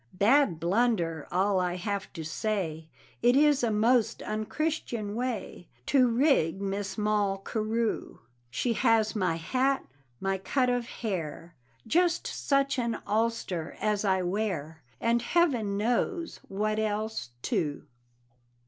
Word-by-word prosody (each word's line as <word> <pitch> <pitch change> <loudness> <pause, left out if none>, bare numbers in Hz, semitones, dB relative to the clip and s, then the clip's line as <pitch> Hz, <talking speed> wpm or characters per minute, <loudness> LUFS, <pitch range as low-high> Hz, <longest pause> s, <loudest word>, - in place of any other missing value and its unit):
Bad 205 - +4
blunder 175 -4 +1
all 190 +2 +2
I 180 -1 0
have 200 +1 -3
to 165 -4 -6
say, 160 -3 -2 0.3
It 245 +2 +5
is 290 0 +5
a 235 - +3
most 225 +2 +2
unchristian 215 -1 -2
way 225 -7 -4 0.2
To 260 -3 +4
rig 235 - +2
Miss 200 +1 -3
Moll 210 -2 +1
Carew 220 +3 -2 0.3
She 235 - 0
has 225 -1 +2
my 185 -5 +1
hat, 260 +11 0 0.3
my 195 0 -1
cut 250 +5 +1
of 245 -1 -1
hair, 175 -8 -4 0.3
Just 345 0 +2
such 275 -1 +1
an 235 -1 -1
ulster 220 -6 -1
as 210 -1 0
I 190 -2 +2
wear, 175 -5 -2 0.2
And 235 +1 +2
heaven 240 -10 +1
knows 245 - -1
what 215 +2 -1
else, 215 - -2
too. 145 -3 -1
215 Hz, 125 wpm, -29 LUFS, 190-240 Hz, 0.3 s, It